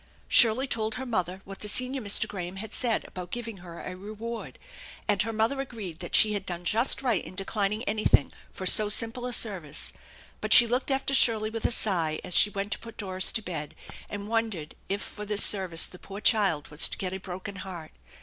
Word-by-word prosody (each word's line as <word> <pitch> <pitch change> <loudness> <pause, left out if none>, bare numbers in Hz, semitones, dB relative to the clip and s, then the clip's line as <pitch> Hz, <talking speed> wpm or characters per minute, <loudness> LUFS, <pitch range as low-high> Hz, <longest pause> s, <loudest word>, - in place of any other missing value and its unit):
Shirley 240 +2 +6
told 220 -4 -2
her 260 - -6
mother 185 -5 -3
what 195 0 -10
the 210 - -6
senior 255 +5 +1
Mr. 200 -2 +3
Graham 180 -2 -7
had 215 +2 -7
said 235 -3 0
about 180 -1 -9
giving 230 -2 -6
her 175 -2 -11
a 185 - -7
reward, 215 +4 -8 0.5
and 205 -2 +1
her 225 - -2
mother 225 +5 -1
agreed 210 -11 -8
that 175 - -3
she 215 -1 +5
had 200 -2 -3
done 175 -2 -6
just 230 +7 +2
right 235 -9 0
in - - -11
declining 205 +2 -2
anything 215 - +1 0.2
for 185 - -8
so 210 +3 +8
simple 230 +3 +2
a - - -5
service, 180 -11 0 0.5
but - - +3
she 240 - +9
looked 250 +4 -2
after 270 0 -1
Shirley 220 -4 +4
with 225 0 -5
a - - +2
sigh 170 -9 +1
as 180 - -5
she 210 - +6
went 200 0 -5
to - - -2
put 230 -1 -12
Doris 185 -2 +1
to 220 - -2
bed, 155 -6 -7 0.3
and 205 0 -7
wondered 220 -9 -3 0.2
if 200 +1 -2
for 210 - -9
this 210 0 0
service 185 -5 +2
the 180 - -11
poor 200 +1 -10
child 195 -9 +2
was 150 +1 +2
to - - -7
get 185 -1 -5
a 190 - -5
broken 190 +2 -8
heart. 180 -4 -9
205 Hz, 215 wpm, -26 LUFS, 185-225 Hz, 0.5 s, she